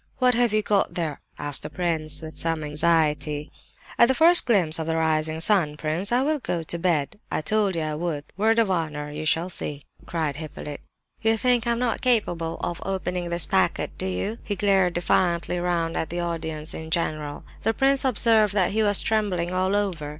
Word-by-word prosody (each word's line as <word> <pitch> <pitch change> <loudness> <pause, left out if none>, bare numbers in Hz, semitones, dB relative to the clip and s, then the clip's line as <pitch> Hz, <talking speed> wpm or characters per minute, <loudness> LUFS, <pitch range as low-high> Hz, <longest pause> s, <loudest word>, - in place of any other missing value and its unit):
"What 250 -1 +3
have 240 -1 +2
you 215 0 +1
got 205 -2 +1
there?" 160 -5 -3 0.2
asked 145 -1 -2
the - - -6
prince, 160 -4 +1
with 160 0 -8
some 165 -1 0
anxiety. 150 -1 +1 0.5
"At 235 - +7
the 265 - +1
first 340 +1 +6
glimpse 175 -9 +3
of 160 - -3
the 160 - 0
rising 160 0 0
sun, 165 -5 +2
prince, 160 +7 -2
I 245 +2 +3
will 305 +1 0
go 170 -9 -3
to 170 +2 -3
bed. 165 -1 0
I - - -1
told 205 +2 +1
you 165 - -1
I 155 0 -2
would, 155 -2 -3
word 220 +4 +2
of 225 -4 +3
honour! 150 -4 -2
You 155 +1 -5
shall 165 +3 +1
see!" 145 -5 -6 0.2
cried 155 -4 -2
Hippolyte. 150 -2 -7 0.4
"You 225 0 +2
think 245 0 +1
I'm 235 0 +1
not 240 -1 -1
capable 175 -10 0
of 175 -1 -3
opening 180 -2 -3
this 170 -2 +3
packet, - - 0
do - - -2
you?" 95 - -3
He 205 - -3
glared 190 -2 +2
defiantly 175 0 +1
round 170 -2 -1
at 160 - -2
the 175 - -4
audience 160 -2 -4
in 160 0 -7
general. 155 -3 -2 0.2
The 225 - +1
prince 270 +3 +2
observed 220 -4 +3
that 190 -2 +2
he 220 +2 +1
was 205 -2 +3
trembling 195 -6 0
all 185 +2 +1
over. 185 -8 -2
175 Hz, 200 wpm, -24 LUFS, 155-210 Hz, 0.5 s, At